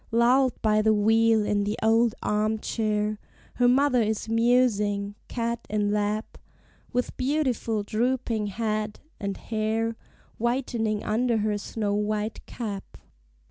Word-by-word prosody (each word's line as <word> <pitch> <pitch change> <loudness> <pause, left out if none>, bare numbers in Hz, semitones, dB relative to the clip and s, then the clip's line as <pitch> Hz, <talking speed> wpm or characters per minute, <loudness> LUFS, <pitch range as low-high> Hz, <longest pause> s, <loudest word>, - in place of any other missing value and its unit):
Lulled 245 +3 +3
by 215 -1 +3
the 215 0 +3
wheel, 225 +1 +3
in 205 0 +1
the 210 +2 -2
old 225 0 +3
arm 215 +1 +1
chair 215 -1 -1 0.4
Her 245 - +4
mother 255 0 +4
is 220 0 -1
musing, 220 -4 +2
cat 235 -1 -3
in 205 -1 0
lap, 210 +1 -2 0.5
With 250 -1 -1
beautiful 255 -6 0
drooping 230 0 -1
head, 215 0 -2 0.2
and 200 -1 -3
hair 225 +1 -1 0.4
Whitening 235 -3 -1
under 235 +2 +1
her 210 0 0
snow 205 0 -2
white 210 +1 -2
cap. 205 -5 -6
220 Hz, 125 wpm, -26 LUFS, 210-235 Hz, 0.5 s, Her